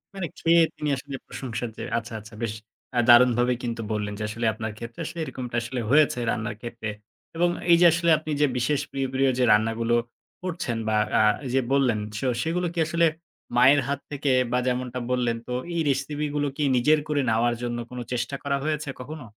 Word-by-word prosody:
মানে 190 Hz, -3 st, -3 dB
খেয়ে 170 Hz, 0 st, +5 dB
তিনি 150 Hz, -1 st, -2 dB
আসলে 140 Hz, +1 st, -7 dB
প্রশংসার 120 Hz, -2 st, -5 dB
যে -, -, -5 dB
আচ্ছা, 115 Hz, 0 st, -5 dB
আচ্ছা। 105 Hz, +1 st, -14 dB
বেশ 115 Hz, -2 st, -1 dB, 0.4 s
আ -, -, +5 dB
দারুণভাবে 120 Hz, 0 st, +6 dB
কিন্তু 115 Hz, -1 st, -3 dB
বললেন 105 Hz, -1 st, -2 dB
যে 105 Hz, -, -3 dB
আসলে 115 Hz, +2 st, -3 dB
আপনার 110 Hz, 0 st, -4 dB
ক্ষেত্রে 115 Hz, +1 st, -9 dB
আসলে 170 Hz, -, -6 dB
এরকমটা 125 Hz, -5 st, -6 dB
আসলে 120 Hz, +2 st, -4 dB
হয়েছে 145 Hz, -2 st, +4 dB
রান্নার 115 Hz, 0 st, -3 dB
ক্ষেত্রে। 115 Hz, -2 st, -5 dB, 0.5 s
এবং 175 Hz, +1 st, +3 dB, 0.2 s
এই 170 Hz, -, +8 dB
যে 175 Hz, -, +7 dB
আসলে 170 Hz, 0 st, +1 dB
আপনি 155 Hz, 0 st, -6 dB
যে -, -, +6 dB
বিশেষ 135 Hz, +4 st, +1 dB
প্রিয়, 135 Hz, -1 st, -1 dB
প্রিয় 135 Hz, 0 st, +3 dB
যে -, -, +4 dB
রান্নাগুলো 115 Hz, +2 st, +2 dB, 0.5 s
করছেন 170 Hz, -10 st, -3 dB
বা 110 Hz, -, +1 dB, 0.2 s
আ -, -, +5 dB, 0.3 s
যে 135 Hz, -, +4 dB
বললেন, 125 Hz, -6 st, +3 dB, 0.2 s
সে 120 Hz, -, -3 dB, 0.2 s
সেগুলো 175 Hz, +2 st, -1 dB
কি 170 Hz, -, -3 dB
আসলে 170 Hz, +1 st, +2 dB, 0.5 s
মায়ের 130 Hz, +4 st, +6 dB
হাত 140 Hz, 0 st, -1 dB
থেকে 140 Hz, 0 st, -2 dB, 0.2 s
বা 125 Hz, -, +2 dB
যেমনটা 125 Hz, 0 st, -2 dB
বললেন 120 Hz, -2 st, +1 dB
তো, 125 Hz, -, -3 dB, 0.2 s
এই 170 Hz, -, +1 dB
রেসিপিগুলো 145 Hz, +1 st, -1 dB
কি 150 Hz, -, 0 dB
নিজের 150 Hz, +5 st, +4 dB
করে 150 Hz, -2 st, +1 dB
নেওয়ার 120 Hz, +2 st, +2 dB
জন্য 120 Hz, -1 st, -2 dB
কোন 125 Hz, 0 st, -7 dB
চেষ্টা 120 Hz, +3 st, -2 dB
করা 140 Hz, -1 st, 0 dB
হয়েছে 150 Hz, -1 st, -2 dB
কখনো? 150 Hz, +1 st, -8 dB
125 Hz, 190 wpm, -25 LUFS, 120-150 Hz, 0.5 s, এই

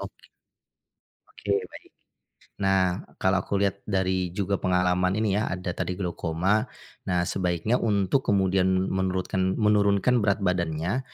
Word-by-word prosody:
Oke. -, -, -10 dB, 1.0 s
Oke, 100 Hz, -, -6 dB, 0.2 s
baik. -, -, -13 dB, 0.7 s
Nah, 95 Hz, -1 st, +2 dB, 0.2 s
kalau 95 Hz, 0 st, +2 dB
aku 100 Hz, -, -2 dB
lihat 100 Hz, 0 st, 0 dB
dari 95 Hz, -2 st, 0 dB
juga 100 Hz, -1 st, -1 dB
pengalaman 90 Hz, +1 st, +1 dB
ini 110 Hz, -2 st, +1 dB
ya 110 Hz, -, -1 dB
ada 90 Hz, -1 st, -3 dB
tadi 90 Hz, +1 st, -3 dB
glaukoma, 90 Hz, +3 st, -1 dB, 0.4 s
nah 90 Hz, -1 st, +1 dB
sebaiknya 90 Hz, +6 st, 0 dB
untuk 105 Hz, +3 st, +1 dB
kemudian 95 Hz, -2 st, +2 dB, 0.2 s
menurutkan 95 Hz, 0 st, -1 dB
menurunkan 105 Hz, +2 st, +3 dB
berat 100 Hz, -1 st, +1 dB
badannya, 85 Hz, +4 st, 0 dB
95 Hz, 125 wpm, -26 LUFS, 90-100 Hz, 1.0 s, menurunkan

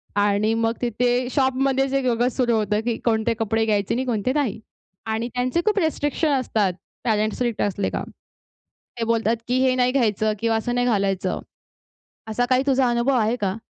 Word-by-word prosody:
आणि 205 Hz, +1 st, +2 dB
मग 225 Hz, 0 st, +1 dB
तिथे 245 Hz, +1 st, +1 dB
शॉपमध्ये 270 Hz, 0 st, +1 dB
जे 275 Hz, 0 st, +1 dB
वेगळंच 245 Hz, -1 st, 0 dB
सुरू 240 Hz, -3 st, +2 dB
होतं 210 Hz, -1 st, +1 dB
की 235 Hz, -2 st, 0 dB
कोणते 225 Hz, 0 st, +2 dB
कपडे 225 Hz, 0 st, +1 dB
घ्यायचे 205 Hz, -3 st, 0 dB
आणि 260 Hz, +2 st, -1 dB
कोणते 240 Hz, 0 st, 0 dB
नाही. 280 Hz, -9 st, -1 dB, 0.5 s
आणि 220 Hz, +1 st, -2 dB
त्यांचे 255 Hz, +7 st, 0 dB
खूप 425 Hz, -1 st, +2 dB
रिस्ट्रिक्शन 315 Hz, -2 st, 0 dB
असतात 210 Hz, -7 st, 0 dB, 0.3 s
पेरेंट्स 215 Hz, -2 st, +1 dB
स्ट्रिक्ट 240 Hz, -3 st, -1 dB
असलेत 200 Hz, -1 st, -1 dB
का. -, -, -2 dB, 1.0 s
ते -, -, 0 dB
बोलतात 230 Hz, 0 st, +1 dB
की 250 Hz, +1 st, +1 dB
हे 255 Hz, -, +2 dB
नाही 250 Hz, 0 st, +2 dB
घ्यायचं 215 Hz, -5 st, +1 dB
किंवा 225 Hz, 0 st, +1 dB
असं 240 Hz, +2 st, -2 dB
नाही 245 Hz, 0 st, +1 dB
घालायचं. 195 Hz, -4 st, 0 dB, 0.9 s
असा 220 Hz, +3 st, 0 dB
काही 255 Hz, +1 st, +4 dB
तुझा 265 Hz, -2 st, +3 dB
अनुभव 240 Hz, +3 st, +1 dB
आहे 225 Hz, +2 st, +1 dB
का? 195 Hz, -1 st, -1 dB
235 Hz, 175 wpm, -23 LUFS, 215-255 Hz, 1.0 s, काही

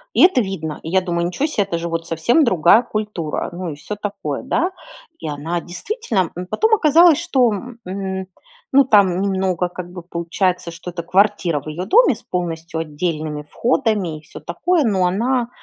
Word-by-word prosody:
И -, -, +5 dB
это 360 Hz, -9 st, +5 dB
видно. 170 Hz, -7 st, -4 dB
И -, -, -7 dB
я 190 Hz, -, +3 dB
думаю: 170 Hz, -1 st, -1 dB
"Ничё 180 Hz, -, -1 dB
се, 220 Hz, -9 st, 0 dB
это 190 Hz, -3 st, -2 dB
же 170 Hz, 0 st, -3 dB
вот 165 Hz, 0 st, -3 dB
совсем 235 Hz, -, +2 dB
другая 185 Hz, -, +5 dB
культура", 210 Hz, -9 st, -3 dB
ну 175 Hz, -1 st, -5 dB
и 150 Hz, -, -5 dB
всё 205 Hz, +8 st, -6 dB
такое, 200 Hz, -9 st, -4 dB
да. 330 Hz, +7 st, 0 dB, 0.5 s
И -, -, -5 dB
она 155 Hz, +4 st, -3 dB
действительно 195 Hz, -, -2 dB
М, 180 Hz, 0 st, -5 dB
потом 440 Hz, -, +2 dB
оказалось, 330 Hz, -2 st, +5 dB
что, 255 Hz, -9 st, +2 dB, 0.3 s
м, 190 Hz, 0 st, -4 dB, 0.5 s
ну 275 Hz, 0 st, +6 dB
там 195 Hz, -6 st, +4 dB
немного 190 Hz, -2 st, 0 dB
как 175 Hz, 0 st, -8 dB
бы 180 Hz, -2 st, -8 dB
получается, 175 Hz, +1 st, -1 dB
что 170 Hz, +2 st, -8 dB
это 170 Hz, -1 st, -5 dB
квартира 180 Hz, -4 st, +2 dB
в 140 Hz, -, -20 dB
ее 165 Hz, +4 st, -4 dB
доме 440 Hz, -, +5 dB
с -, -, -12 dB
полностью 165 Hz, -2 st, -4 dB
отдельными 155 Hz, -1 st, -3 dB
входами, 210 Hz, -, 0 dB
и -, -, -15 dB
всё 155 Hz, -, -11 dB
такое, 310 Hz, -, 0 dB
но 190 Hz, -5 st, +2 dB
она, 235 Hz, +6 st, 0 dB
185 Hz, 185 wpm, -20 LUFS, 170-225 Hz, 0.5 s, ну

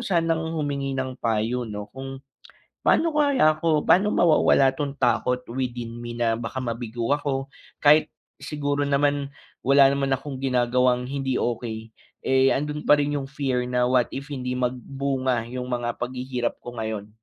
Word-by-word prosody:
sanang 165 Hz, -2 st, 0 dB
humingi 140 Hz, -3 st, -2 dB
ng 130 Hz, -1 st, -3 dB
payo 115 Hz, +2 st, -1 dB
'no 105 Hz, -1 st, -7 dB
kung, 135 Hz, 0 st, -8 dB, 0.7 s
pa'no 330 Hz, 0 st, +4 dB
kaya 285 Hz, -, +4 dB
ako 155 Hz, -2 st, +2 dB
pa'no 205 Hz, +4 st, +5 dB
mawawala 155 Hz, -5 st, +4 dB
'tong 140 Hz, 0 st, -3 dB
takot 125 Hz, 0 st, +1 dB
within 120 Hz, -2 st, -3 dB
me, 120 Hz, 0 st, -6 dB
na 115 Hz, -1 st, +1 dB
baka 115 Hz, +2 st, -4 dB
mabigo 115 Hz, 0 st, -3 dB
ako 140 Hz, -2 st, -1 dB, 0.3 s
kahit 150 Hz, +1 st, +6 dB, 0.3 s
siguro 145 Hz, -1 st, -2 dB
naman, 140 Hz, 0 st, +1 dB, 0.3 s
wala 140 Hz, +1 st, +6 dB
naman 140 Hz, -1 st, 0 dB
akong 135 Hz, 0 st, -4 dB
ginagawang 125 Hz, -1 st, +2 dB
hindi 135 Hz, -2 st, -2 dB
okey, 115 Hz, -2 st, -3 dB, 0.4 s
eh, 130 Hz, 0 st, +4 dB
andun 150 Hz, +2 st, -3 dB
pa -, -, +8 dB
rin 145 Hz, 0 st, 0 dB
yung 140 Hz, -, -4 dB
fear 130 Hz, -3 st, -1 dB
na 125 Hz, 0 st, +2 dB
what 125 Hz, -2 st, +4 dB
if 140 Hz, +2 st, -6 dB
hindi 125 Hz, -2 st, -3 dB
magbunga 130 Hz, 0 st, -1 dB
yung 125 Hz, 0 st, -4 dB
mga 120 Hz, -1 st, -2 dB
paghihirap 125 Hz, 0 st, -3 dB
ko 120 Hz, 0 st, -9 dB
ngayon? 110 Hz, -2 st, -4 dB
130 Hz, 155 wpm, -24 LUFS, 120-145 Hz, 0.7 s, pa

